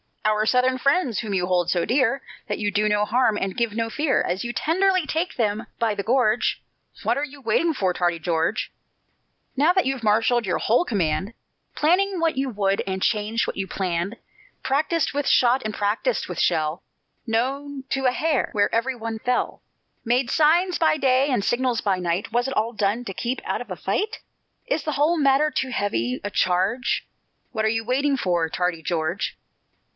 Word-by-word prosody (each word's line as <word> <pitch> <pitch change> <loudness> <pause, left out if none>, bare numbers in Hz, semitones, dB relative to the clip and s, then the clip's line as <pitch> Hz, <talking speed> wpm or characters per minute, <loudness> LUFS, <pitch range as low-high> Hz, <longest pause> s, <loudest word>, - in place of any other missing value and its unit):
"Our 215 0 +2
Southern 255 +1 +2
friends!" 275 - +1
whom 210 -4 -3
you 180 -1 +1
hold 180 -1 +1
so 175 -2 +1
dear 270 +1 +1 0.2
That 205 - -2
you 205 -1 -1
do 210 +1 +1
no 210 0 +2
harm 230 -2 +2
and 195 -2 -2
give 235 -3 0
no 230 0 -1
fear, 270 +4 +1
As 180 +2 -2
you 240 - -3
tenderly 370 +3 +2
take 325 +5 -2
them 215 -2 -1
by 230 -2 +1
the 205 - -3
gorge 240 -1 +1 0.4
What 240 - +1
are 280 - -1
you 290 -1 -7
waiting 295 +8 +1
for, 190 -9 0
tardy 175 -1 0
George? 165 0 -1 0.8
Now 300 +6 +4
that 375 -1 +2
you've 265 -2 -2
marshalled 225 +2 +2
your 180 - 0
whole 240 +11 +2
command, 195 - -1 0.4
Planned 370 +4 +2
what 325 -5 +1
you 270 0 0
would, 200 -3 0
and 190 0 -2
changed 215 +1 +1
what - - -5
you 195 -1 -2
planned; 185 +3 -2 0.5
Practised 300 +4 0
with 290 0 -1
shot 250 +1 +4
and 215 - -2
practised 210 - -1
with - - -5
shell, 160 -1 +1 0.5
Know 270 +5 -2
to 270 -1 -1
a 255 - +5
hair 300 +1 0
where 205 -1 +1
every 245 +3 0
one 225 -1 -5
fell, 250 +1 -1 0.4
Made 245 +2 +1
signs 340 +4 +3
by 320 -2 +3
day 265 0 +3
and 245 -7 +1
signals 240 +1 0
by 195 -3 0
night; 180 +4 -2
Was 240 +3 +1
it 270 - -4
all 225 +3 0
done 215 +3 0
to 195 - -5
keep 245 +6 -2
out - - -2
of 245 - -9
a 185 - -4
fight? 405 - -2 0.5
Is 315 - -1
the 305 - -2
whole 305 +5 +2
matter 285 +1 +3
too 260 -1 -1
heavy 125 - -1
a 205 - -4
charge? 190 +9 +1 0.5
What 220 -2 -1
are - - +3
you 225 +1 -1
waiting 270 +4 +1
for, 175 -7 0
tardy 180 -1 -1
George? 160 +2 -2
235 Hz, 190 wpm, -23 LUFS, 200-270 Hz, 0.8 s, a